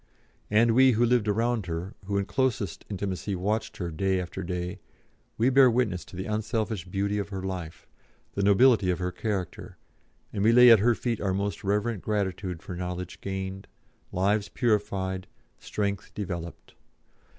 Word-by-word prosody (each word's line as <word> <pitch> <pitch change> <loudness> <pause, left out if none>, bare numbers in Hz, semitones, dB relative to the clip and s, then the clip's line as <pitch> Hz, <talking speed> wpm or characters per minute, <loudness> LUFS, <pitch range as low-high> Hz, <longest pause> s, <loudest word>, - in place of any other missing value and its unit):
And 115 +2 +4
we, 130 +1 +6
who 115 +2 +3
lived 120 -2 +2
around 115 -1 0
her, 85 +4 -4
who 100 +1 -1
in 100 - 0
closest 115 -8 -1
intimacy 100 0 -3
watched 105 +5 -2
her 85 -3 -3
day 95 +4 0
after 90 -1 -5
day, 90 0 -4 0.6
we 120 +4 +3
bear 135 -1 +7
witness 115 -7 0
to - - -13
the 95 +2 -4
unselfish 110 -2 -2
beauty 100 +2 -1
of 100 - -4
her 95 -2 -5
life, 90 -4 -5 0.5
the 100 - -1
nobility 100 0 +5
of 90 - +1
her 90 0 -2
character, 95 -4 -4 0.6
and 100 - -1
we 115 +2 +5
lay 125 0 +9
at 115 - +8
her 115 +3 +3
feet 115 -2 -2
our 95 -2 0
most 100 +1 -2
reverent 105 +1 0
gratitude 95 -4 -2
for 90 - -6
knowledge 90 0 -5
gained, 95 0 -5 0.4
lives 100 +3 +1
purified, 100 -5 -1 0.3
strength 100 -1 -3
developed. 85 -5 -6
100 Hz, 160 wpm, -27 LUFS, 95-110 Hz, 0.6 s, lay